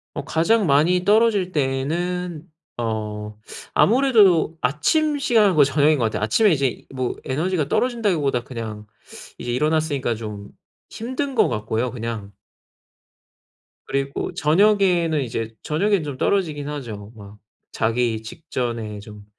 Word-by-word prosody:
어 - - -4
가장 190 +6 +2
많이 160 +6 +3
떨어질 210 -3 +3
때는 165 +4 -2 0.3
어 105 -2 -4 0.4
아무래도 210 - +4
아침 295 - +1
시간 220 - +3
거의 145 -2 +6
저녁인 145 +2 +3
것 120 - +1
같아요. 110 - -2
아침에 195 - +3
이제 135 -5 -1
뭐 130 -1 -2
에너지가 155 +3 -1
떨어진다기보다 175 - 0
그냥 110 -4 -7 0.5
이제 120 - -4
일어났으니까 145 -2 0
좀 105 -2 -7 0.4
힘든 260 +4 -4
것 225 - +4
같고요 110 +2 -2
그냥. 115 -4 -6 1.5
그리고 140 0 -2
저녁에는 175 -2 +3
이제 115 -2 -4
저녁에는 195 +4 +1
좀 145 -3 -6
떨어지긴 150 -5 0
하죠. 110 -8 -7
막 105 0 -12 0.3
자기 115 0 0
직전에 115 -5 -5
좀 105 0 -12
145 Hz, 280 characters per minute, -22 LUFS, 115-180 Hz, 1.5 s, 거의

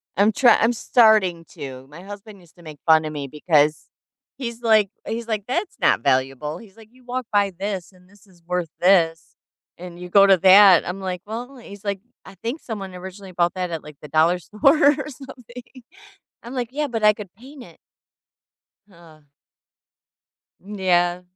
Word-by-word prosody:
I'm 205 +3 +3
try 235 +2 +5
I'm 230 +2 +2
starting 215 -8 +3
to. 130 -1 -9
My 155 +4 -12
husband 205 +1 -11
used 175 -3 -22
to 175 - -18
make 155 -3 -11
fun 160 -1 +5
of 155 - -4
me 145 -2 -5
because 150 +1 +1 0.5
he's 235 -3 -6
like 215 -4 +3 0.2
he's 230 +1 -4
like, 215 -3 -2
"That's 260 +11 -3
not - - +3
valuable." 135 +3 -1
He's 210 -2 -17
like, 220 -1 -16
"You 255 +1 -23
walk 250 +1 -4
by 200 -1 +2
this, 195 -3 -4
and 180 -1 -23
this 205 0 -22
is 180 -3 -24
worth 180 -2 -2
this, 170 -3 +2 0.4
and 175 0 -10
you 180 - -9
go 200 +2 +6
to 195 -1 +5
that." 190 0 +7
I'm 185 +2 -5
like, 185 -2 -4
"Well," 240 +5 -7
he's 200 -5 -13
like, 200 -2 -3 0.3
"I 195 - -13
think 235 - -6
someone 195 -5 -7
originally 190 +1 -10
bought 175 0 +1
that 180 -1 -3
at, 165 -2 -5
like, 150 -1 -13
the 150 - -10
dollar 160 +4 +2
store 215 - +2 0.2
or - - -5
something." 250 -2 -13 0.6
I'm 235 +3 -9
like, 245 -3 -3
"Yeah, 300 +2 -2
but 225 -4 -3
I 210 - +7
could 205 -4 -11
paint 260 +6 -14
it. - - -17 1.1
Huh. 170 -4 -19 1.4
M 205 +3 -10
yeah. 175 -1 +1
195 Hz, 185 wpm, -22 LUFS, 175-225 Hz, 1.4 s, that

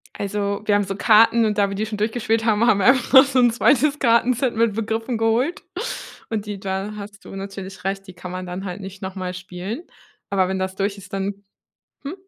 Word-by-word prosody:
Also, 200 0 -2
wir 205 - +3
haben 205 - +3
so 195 0 -4
Karten 225 +2 +5
und 210 -1 0
da 200 -1 +3
wir 195 - -4
die 210 +2 -1
schon 215 0 -5
durchgespielt 225 +1 0
haben, 220 0 +3
haben 205 -3 +4
wir 195 - +1
einfach 260 -1 +3
noch 265 -1 +11
so 265 -1 +1
'n 240 -1 +5
2 280 +5 +3
Kartenset 240 +1 +2
mit 225 -1 +2
Begriffen 225 +2 -2
geholt 240 - +1 0.7
und 215 -2 -2
die 205 -2 -5
da 195 +2 -3
hast 200 0 -10
du - - -11
natürlich 195 -1 -7
recht, 195 +1 -3
die 185 - -10
kann 180 0 -9
man 185 0 -5
dann 180 +2 -6
halt 185 +1 -6
nicht 190 0 -9
nochmal 185 -1 -4
spielen. 185 - -6 0.5
Aber 190 -2 +2
wenn 190 0 -2
das 190 0 -3
durch 200 +1 -1
ist, 195 0 -13
dann 195 +1 -3 0.6
hm? 285 +5 -4
205 Hz, 220 wpm, -22 LUFS, 195-230 Hz, 0.7 s, noch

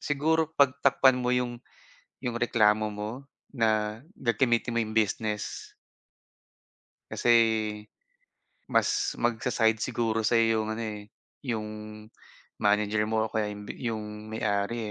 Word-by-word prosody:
siguro 155 +2 +1
pag 140 -2 +5
takpan 130 -2 +5
mo 125 0 -2
yung 120 -1 -2 0.6
yung 120 -1 -2
reklamo 110 -2 +3
mo, 105 +1 -4 0.4
na 110 -3 0 0.2
gagamitin 120 0 +1
mo - - +3
yung 110 0 -4
business. 105 -1 -1 1.4
Kasi, - - -2 1.4
mas 410 -1 +1
mag-sa-side 110 -1 +1
siguro 115 -1 -1
sayo 115 -1 +3
yung 110 - -5
ano 115 +1 -3
eh, 105 -2 -5 0.4
yung 110 -4 -2 0.9
manager 105 +1 +2
mo, 110 0 +1
o - - -21
kaya 105 -1 0
yung 105 0 -8
bi - - -3 0.2
yung 110 -1 -4 0.3
may-ari 100 +1 -1
110 Hz, 120 wpm, -28 LUFS, 105-120 Hz, 1.4 s, pag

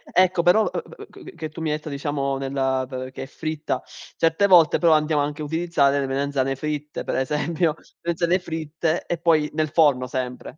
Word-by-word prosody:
Ecco, 185 -1 +4
però, 180 +5 +5
uhm, - - -2 0.2
uhm, - - -9 0.2
che - - -11
che 160 -2 -5
tu 165 - -9
mi 160 - -1
hai 150 - 0
detto, 155 0 -9
diciamo, 140 -1 -2
nella 135 -1 -1
t 130 0 -5
che 130 - -7
è - - -6
fritta. 155 +2 -4 0.4
Certe 165 +5 +3
volte, 175 -4 +6
però, 165 -2 +4
andiamo 155 -1 +2
anche 150 +1 -3
a - - -3
utilizzare 150 -3 +1
le 135 - -1
melanzane 135 0 -1
fritte, 150 +1 -4
per - - -2
esempio, 150 +4 0 0.3
melanzane 170 +1 +1
fritte, 160 -1 -3
e 175 - -2
poi 160 -3 +3
nel 155 0 0
forno, 145 -5 +3
sempre. 125 +3 -5
150 Hz, 200 wpm, -23 LUFS, 140-165 Hz, 0.4 s, volte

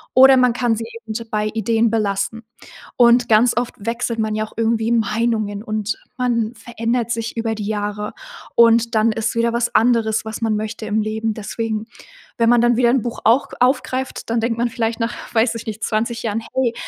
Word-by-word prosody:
oder 265 +1 +8
man 250 -1 +4
kann 240 -1 +1
sie 225 +1 -5 0.2
eben 220 -1 -6 0.2
bei 215 0 -1
Ideen 225 +1 +1
belassen. 210 0 -1 0.5
Und 240 0 +5
ganz 225 +2 +4
oft 245 0 -1
wechselt 230 +2 -2
man 215 -1 0
ja 215 - -1
auch - - -18
irgendwie 225 0 +1
Meinungen 220 -2 0
und 215 -1 -3 0.2
man 240 -2 0
verändert 235 +1 -2
sich 230 0 -3
über 225 -1 -1
die 210 -2 -5
Jahre 210 0 -3 0.4
und 230 0 +4
dann 220 +1 +3
ist 225 +1 -2
wieder 230 0 +1
was 235 0 -1
anderes, 225 -2 +2
was 220 0 -6
man 220 -1 +1
möchte 215 +1 -4
im 215 +1 +1
Leben. 220 +1 -2
Deswegen, 220 0 -4 0.5
wenn 230 0 +3
man 240 -1 +5
dann 240 -1 +3
wieder 240 -1 +4
'n 260 0 +2
Buch 240 - -4
auch 235 +5 +4
aufgreift, 255 +1 0
dann 230 - +1
denkt 230 0 -1
man 240 +1 0
vielleicht 230 0 -2
nach, 230 +1 -1 0.2
weiß 225 +1 +3
ich 230 - -7
nicht, 220 0 -5
20 230 +1 -1
Jahren: 220 -1 -1
„Hey, 255 -3 +1
230 Hz, 195 wpm, -20 LUFS, 220-235 Hz, 0.5 s, oder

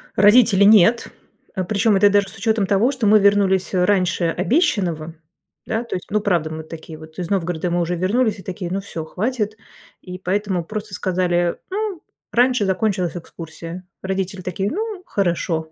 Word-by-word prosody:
Родители- 210 0 +5
нет, 220 +2 +5 0.5
а, 185 - -1
причём 210 +3 +2
это 205 +1 +5
даже 200 0 +2
с 220 - -11
учётом 220 0 +1
того, 210 +6 +3
что 250 -6 -1
мы 215 +1 +6
вернулись 195 -2 +2
раньше 185 -1 +2
обещанного, 175 - 0 0.5
да, 225 +2 -2
то 235 - -5
есть. 180 - -6
Ну, 210 - +2
правда, 175 -6 0
мы 160 0 -6
такие 160 0 -10
вот, 155 0 -14
из 175 - -4
Новгорода 175 -3 -1
мы 175 - +1
уже 175 +1 -1
вернулись, 210 +5 0
и 190 - -11
такие: 180 -1 -5
"Ну 195 +1 -1
всё, 165 -5 -6
хватит", 215 +3 -2 0.4
и 180 0 -8
поэтому 190 -1 -1
просто 215 +1 -6
сказали: 175 -2 0
"Ну, 400 -3 -3 0.3
раньше 245 -2 +3
закончилась 190 -2 0
экскурсия". 170 +1 -9
Родители 190 0 -3
такие: 190 +3 -2
"Ну, 425 -1 -4
хорошо". 170 -4 -1
190 Hz, 170 wpm, -21 LUFS, 175-215 Hz, 0.5 s, мы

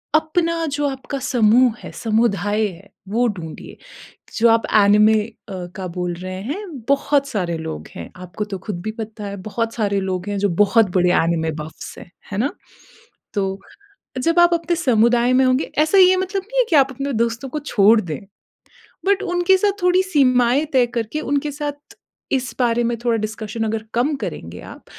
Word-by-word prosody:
अपना 330 +1 +1
जो 290 -1 -2
आपका 270 +1 -5
समूह 245 -1 +3
है, - - -8
समुदाय 215 -2 0
है, 190 +1 -12 0.2
वो 240 +3 +2
ढूँढिए। 175 -7 -7 0.6
जो 230 +1 +5
आप 225 0 +3 0.2
एनिमे 210 +2 +5
अ, 230 - -12 0.5
का 185 -1 -4
बोल 180 0 -3
रहे 185 +2 -6
हैं, 295 - -4 0.3
बहुत 280 0 +2
सारे 180 -9 -2
लोग 80 - -6
हैं। 85 - -7
आपको 180 +3 -6
तो 195 - -2
खुद 175 -5 -4
भी 215 - -3
पता 215 -1 -6
है, 200 0 -5
बहुत 230 +2 -2
सारे 200 -3 0
लोग 185 0 -3
हैं, 205 - -2
जो 205 0 +1
बहुत 205 +1 +3
बड़े 180 0 +3
एनिमे 165 -1 0
बफ़्स 155 - -10
हैं। 175 - -13 0.2
है 200 - -3
ना? 265 +6 0 0.8
तो 195 -1 -2 0.6
जब 330 +5 +1
आप 345 0 +5
अपने 340 +1 -1
समुदाय 240 -4 +3
में 260 +1 +4
होंगे, 255 +2 +2
ऐसा 315 +6 +4
ये 370 0 +7
मतलब 375 +1 -2
नहीं - - -5
है - - +4
कि 315 - +4
आप 270 -1 +5
अपने 275 +2 -4
दोस्तों 235 +3 -1
को 300 - -4
छोड़ 220 -5 +4
दें। 165 -4 -5 0.9
बट 400 -1 +2
उनके 355 +2 +2
साथ 405 +1 +2
थोड़ी 360 +1 +4
सीमाएँ 260 -5 +3
तय 250 -2 +4
करके, 235 +5 -3
उनके 285 0 -1
साथ 290 0 -7 0.4
इस 255 -2 -1
बारे 240 -1 +2
में 235 0 0
थोड़ा 235 -1 +2
डिस्कशन 215 +1 -4
अगर 220 0 -2
कम 260 +6 +1
करेंगे - - -6
आप, - - -12
235 Hz, 185 wpm, -20 LUFS, 205-285 Hz, 0.9 s, ये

